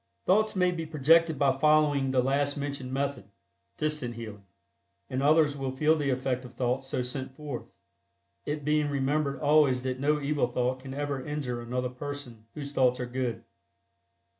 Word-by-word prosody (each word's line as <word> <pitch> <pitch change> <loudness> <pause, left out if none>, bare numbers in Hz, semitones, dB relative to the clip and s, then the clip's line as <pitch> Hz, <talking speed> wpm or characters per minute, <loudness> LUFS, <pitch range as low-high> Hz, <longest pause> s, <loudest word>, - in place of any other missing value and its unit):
Thoughts 215 +3 +3
may 180 -1 +3
be 165 -2 -4
projected 160 +1 +4
by 135 -1 +2
following 150 -2 +4
the 130 -1 +2
last 140 +2 +1
mentioned 140 -2 -4
method 140 +1 -2 0.5
(Distant 150 -6 -1
Healing) 105 -4 -9 0.6
and 130 +1 -1
others 150 0 +4
will 135 -2 -4
feel 155 +3 +4
the 145 -3 -1
effect 130 0 -1
of 125 - -12
thought 125 +1 0
so 130 -1 -2
sent 130 +1 -5
forth, 145 -4 -6 0.7
it 150 -1 -4
being 150 0 +2
remembered 140 0 0
always 145 -4 +4
that 130 0 -2
no 150 +2 +2
evil 145 -2 0
thought 125 +1 -1
can 135 0 -8
ever 145 -2 -2
injure 130 -5 -3
another 125 +2 -2
person 125 -4 -8
whose 145 -2 -6
thoughts 130 -3 +2
are 125 - -2
good. 125 -1 -3
140 Hz, 165 wpm, -28 LUFS, 130-150 Hz, 0.7 s, projected